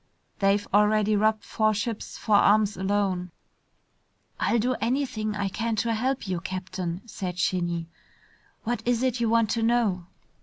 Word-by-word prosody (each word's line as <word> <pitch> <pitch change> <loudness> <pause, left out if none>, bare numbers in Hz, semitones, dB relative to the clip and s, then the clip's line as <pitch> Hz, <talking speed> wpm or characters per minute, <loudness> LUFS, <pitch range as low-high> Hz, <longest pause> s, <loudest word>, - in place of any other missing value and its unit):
They've 200 +1 +2
already 210 +1 +4
robbed 215 +1 +2
four 215 -1 +1
ships 220 +1 -4
for 220 - -1
arms 205 0 +4
alone." 190 -2 -1 1.1
"I'll 235 - +2
do 245 +3 +1
anything 230 -4 -1
I 200 -1 -1
can 225 +3 -2
to 230 +1 0
help 255 +1 -1
you, 185 -2 -1
Captain," 185 -1 -4
said 185 -5 -5
Shinny. 175 -2 -1 0.8
"What 240 -1 -2
is 245 +1 +1
it 255 -2 0
you 230 -1 +1
want 230 -1 +3
to 230 - 0
know?" 225 -7 +1
210 Hz, 150 wpm, -26 LUFS, 190-230 Hz, 1.1 s, already